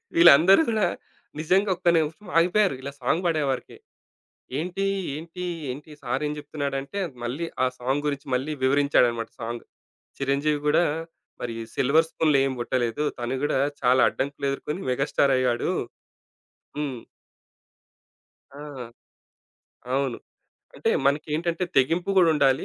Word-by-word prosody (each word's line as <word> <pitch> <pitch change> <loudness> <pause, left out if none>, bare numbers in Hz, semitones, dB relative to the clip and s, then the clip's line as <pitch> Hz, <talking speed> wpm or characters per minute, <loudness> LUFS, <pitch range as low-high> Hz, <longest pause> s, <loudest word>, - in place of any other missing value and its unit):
వీళ్ళందరూ 170 - +8
గూడా 215 -5 +2 0.5
నిజంగా 190 +6 +2
ఒక్క 180 -1 +2
నిమిషం 160 +5 -2
ఆగిపోయారు 180 0 +3
ఇలా 140 +1 -5
సాంగ్ 160 +8 +1
పాడేవరికి. 150 -6 -1 0.8
ఏంటి, 180 +4 -2 0.3
ఏంటి, 170 +3 -7 0.3
ఏంటి, 145 +4 -8
సారు 125 +4 -2
ఏం‌ 150 - -2
జెప్తున్నాడంటే, 145 +3 -4 0.2
మళ్ళీ 140 +8 -3 0.2
ఆ - - +3
సాంగ్ 135 +4 -1
గురించి 140 0 -4
మళ్ళీ 135 +5 -1
వివరించాడన్నమాట 130 -4 +2
సాంగ్ 115 +1 -5 0.5
'చిరంజీవి‌' 145 +2 0
గూడా 160 +4 +4 0.6
మరి 120 -2 -3 0.2
సిల్వర్ 155 +5 +3
స్పూన్‌లో 150 -3 +2
ఏమి‌పుట్టలేదు. 125 +1 -1 0.2
తను 120 +2 -2
గూడా 140 - +1 0.2
చాలా 125 +1 +4
అడ్డంకులెదుర్కొని 140 +5 -3
మెగాస్టార్ 135 +1 +2
అయ్యాడు. 125 -2 +1 1.1
హ్మ్. 140 -5 -3 1.5
ఆ! 140 - -12 1.3
అవును. 135 -3 0 0.6
అంటే - - 0 0.2
మనకేంటంటే, 160 +5 0
తెగింపు‌ 165 +8 +2
గూడుండాలి. 150 -7 +4
145 Hz, 110 wpm, -25 LUFS, 130-165 Hz, 1.5 s, వీళ్ళందరూ